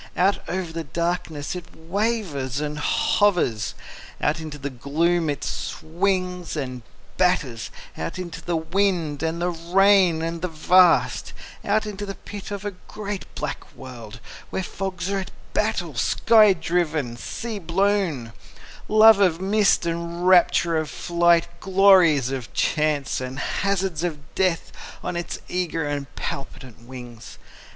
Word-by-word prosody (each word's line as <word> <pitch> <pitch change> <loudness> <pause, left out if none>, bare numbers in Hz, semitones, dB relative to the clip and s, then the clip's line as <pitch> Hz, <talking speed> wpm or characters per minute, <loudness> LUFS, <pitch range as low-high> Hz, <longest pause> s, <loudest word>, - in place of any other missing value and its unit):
Out 190 +4 +3
over 180 -2 -3
the 165 0 -3
darkness 170 -1 -3
it 175 -1 -9
wavers 170 - -2
and 150 0 -3
hovers, 150 - +1 0.4
Out 155 +2 0
into 155 -2 -7
the 140 0 -5
gloom 160 +6 0
it 145 -1 -3
swings 180 +1 -2
and 130 -4 -4 0.4
batters, 145 -11 +1 0.3
Out 80 - -5
into 170 -2 -6
the 175 0 -2
wind 165 -3 0
and 165 +1 -1
the 175 +1 0
rain 175 0 +3
and 165 0 -3
the 180 - -1
vast, 175 +1 +3 0.3
Out 215 +1 +1
into 205 -1 -5
the 195 - -5
pit 205 -2 -9
of 200 0 -5
a 205 - -2 0.2
great 205 -2 -5
black - - -5
world, 115 -4 -10 0.3
Where 190 - -2
fogs 185 -1 -4
are 200 - 0
at 190 - -5 0.2
battle, - - 0
sky 215 -3 +5
driven, 160 -7 -1
sea 225 - -5
blown, 175 - 0 0.5
Love 215 0 +7
of 180 -4 +3
mist 195 -1 +3
and 170 +1 -2
rapture 175 -2 +5
of 155 -1 -3
flight, 170 -1 +2
Glories 185 -8 +5
of 130 -3 -5
chance 150 -4 0
and 130 +1 -5
hazards 190 0 -1
of 150 -4 -5
death 185 -3 0 0.3
On 180 - -3
its 175 0 -4
eager 170 -3 -2
and 145 -1 -3
palpitant 130 -4 -7
wings. 120 -3 -10
170 Hz, 140 wpm, -23 LUFS, 150-190 Hz, 0.5 s, Love